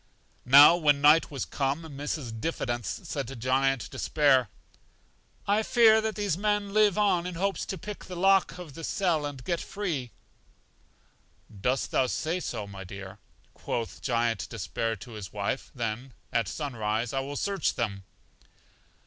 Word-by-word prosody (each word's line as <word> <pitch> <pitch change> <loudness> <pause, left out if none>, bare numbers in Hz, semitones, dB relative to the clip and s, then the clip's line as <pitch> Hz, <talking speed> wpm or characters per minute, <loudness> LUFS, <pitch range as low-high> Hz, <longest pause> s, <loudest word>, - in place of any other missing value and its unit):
Now, 145 +6 +9
when 145 -4 +3
night 150 +3 +5
was 140 -3 -4
come, 140 +3 -2
Mrs. 140 -6 -5
Diffidence 120 - -3
said 145 -7 -4
to 135 - -7
Giant 130 +1 +1
Despair: 135 -6 +2 1.0
I 205 +2 +3
fear 220 -1 +5
much - - +2
that 220 - -1
these 200 -5 -1
men 205 -1 0
live 210 -3 +4
on 185 -4 +2
in 180 - -5
hopes 195 +3 -1
to 190 - -4
pick 210 +2 -8
the 180 - -8
lock 195 +1 +3
of 175 -6 -9
the 165 - -9
cell 170 -8 0
and 135 -3 -8
get 170 +3 -1
free. 165 -12 -3 1.5
Dost 130 +4 0
thou 130 - +2
say 165 +7 -1
so, 115 - -4
my 100 -1 -9
dear? 95 +2 -9 0.3
quoth 115 -2 -4
Giant 115 -3 0
Despair 115 +1 -3
to 100 +4 -12
his 105 -4 -8
wife; 105 +5 -3
then 120 +2 -4 0.2
at 115 -3 +1
sun 145 - -4
rise 110 +2 -1
I 135 - 0
will 140 +2 -5
search 200 -1 0
them. 100 -5 -3
140 Hz, 160 wpm, -28 LUFS, 120-180 Hz, 1.5 s, Now